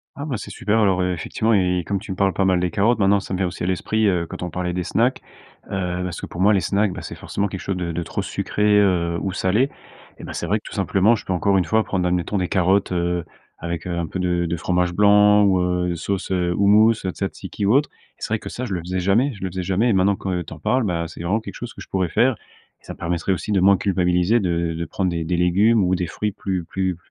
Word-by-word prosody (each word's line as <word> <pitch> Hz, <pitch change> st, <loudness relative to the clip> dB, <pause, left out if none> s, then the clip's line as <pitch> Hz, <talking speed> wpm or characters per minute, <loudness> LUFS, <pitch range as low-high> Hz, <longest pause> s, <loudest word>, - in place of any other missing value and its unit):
Ah, 140 Hz, -, -5 dB
bah, 135 Hz, -7 st, -3 dB
c'est -, -, -8 dB
super, 110 Hz, +2 st, 0 dB
alors, 95 Hz, -4 st, +2 dB
ef 90 Hz, 0 st, 0 dB
effectivement 110 Hz, +6 st, -1 dB
et 90 Hz, -3 st, +2 dB
comme 100 Hz, -1 st, -1 dB
tu 105 Hz, +1 st, -8 dB
me 95 Hz, -, -5 dB
parles 95 Hz, -1 st, +2 dB
pas 95 Hz, -, 0 dB
mal 95 Hz, -1 st, +3 dB
des 90 Hz, -1 st, -1 dB
carottes, 110 Hz, +3 st, +2 dB
maintenant 100 Hz, 0 st, +4 dB
ça 95 Hz, -, -7 dB
me 90 Hz, -, 0 dB
vient 95 Hz, -, +1 dB
aussi 90 Hz, -, -6 dB
à -, -, -1 dB
l'esprit, 110 Hz, +4 st, 0 dB
heu, 90 Hz, -3 st, +1 dB
quand -, -, -8 dB
on 90 Hz, -, -3 dB
parlait 90 Hz, +1 st, -3 dB
des 90 Hz, 0 st, -2 dB
snacks, 120 Hz, +9 st, +1 dB, 0.5 s
heu, 90 Hz, -2 st, -2 dB
parce 90 Hz, -1 st, -4 dB
que, -, -, -5 dB
pour 85 Hz, -, -6 dB
moi, 100 Hz, +3 st, +5 dB
les 100 Hz, -, +3 dB
snacks, 100 Hz, +1 st, +1 dB
bah, 95 Hz, -, -7 dB
c'est 85 Hz, -, -7 dB
forcément 100 Hz, -, -3 dB
quelque 95 Hz, -2 st, -6 dB
chose 95 Hz, 0 st, -3 dB
de 85 Hz, -2 st, -3 dB
de 85 Hz, +1 st, -3 dB
trop -, -, -4 dB
sucré, 105 Hz, -, -3 dB, 0.2 s
heu, 85 Hz, -4 st, +2 dB
ou 95 Hz, -, -2 dB
salé. 105 Hz, +9 st, +1 dB, 0.5 s
Eh -, -, -12 dB
bah, -, -, -7 dB
c'est -, -, -4 dB
vrai -, -, +2 dB
que -, -, -33 dB
tout -, -, -9 dB
simplement, 100 Hz, +5 st, +3 dB
je -, -, -8 dB
peux 95 Hz, -, -1 dB
encore 95 Hz, +3 st, +2 dB
une 90 Hz, -, +2 dB
fois, 110 Hz, 0 st, +2 dB
prendre, 90 Hz, -4 st, -1 dB
admettons, 90 Hz, +3 st, -1 dB
des 90 Hz, -, 0 dB
carottes, 95 Hz, +1 st, +2 dB
heu, 85 Hz, -1 st, -1 dB, 0.4 s
avec, 85 Hz, -1 st, -4 dB
heu, 85 Hz, -, -2 dB
un 85 Hz, -1 st, -2 dB
peu 95 Hz, -, -5 dB
de 90 Hz, -1 st, 0 dB
de 85 Hz, -, -2 dB
fromage 90 Hz, +1 st, 0 dB
blanc 105 Hz, +1 st, +5 dB
ou, 95 Hz, -2 st, +3 dB
heu, 90 Hz, -1 st, 0 dB
sauce, 95 Hz, +4 st, -3 dB
heu, 90 Hz, -2 st, +1 dB
houmous, 105 Hz, +3 st, +5 dB
tzatzíki 95 Hz, 0 st, -4 dB
ou 100 Hz, -, +3 dB
autre 145 Hz, +3 st, +3 dB, 0.3 s
et -, -, -31 dB
c'est -, -, -4 dB
vrai 110 Hz, -, 0 dB
que -, -, -8 dB
ça, 125 Hz, -, -5 dB
je 105 Hz, -, -4 dB
le 90 Hz, -, -1 dB
faisais 90 Hz, +2 st, -3 dB
jamais, 105 Hz, +10 st, +2 dB
je 95 Hz, -, -10 dB
le 95 Hz, -, -1 dB
faisais 90 Hz, +1 st, -4 dB
jamais 95 Hz, +6 st, +1 dB
et -, -, +3 dB
maintenant 95 Hz, +1 st, +3 dB
que 95 Hz, -2 st, -3 dB
tu 80 Hz, -, -9 dB
en 80 Hz, -, -11 dB
parles, 130 Hz, +10 st, +1 dB
bah, 85 Hz, -5 st, -1 dB
c'est 80 Hz, -, -10 dB
vraiment 95 Hz, +6 st, 0 dB
quelque 110 Hz, -, -9 dB
chose 120 Hz, -1 st, -7 dB
que -, -, -11 dB
je -, -, -10 dB
pourrais 95 Hz, -2 st, 0 dB
faire 125 Hz, +8 st, +2 dB, 0.5 s
et -, -, -34 dB
ça -, -, -8 dB
me -, -, -16 dB
permettrait 85 Hz, +2 st, -2 dB
aussi 95 Hz, -, -4 dB
de 100 Hz, -, +3 dB
moins 95 Hz, +1 st, +5 dB
culpabiliser, 90 Hz, +2 st, +2 dB
de 85 Hz, -4 st, -1 dB
de 85 Hz, +1 st, -4 dB
prendre 95 Hz, +3 st, -2 dB
des 85 Hz, -1 st, -2 dB
des 85 Hz, +2 st, -1 dB
légumes 100 Hz, +5 st, +3 dB
ou 90 Hz, 0 st, +1 dB
des 90 Hz, -1 st, -2 dB
fruits 105 Hz, +5 st, -3 dB
plus 95 Hz, -3 st, -3 dB
plus 95 Hz, 0 st, -2 dB
95 Hz, 285 wpm, -22 LUFS, 90-100 Hz, 0.5 s, moi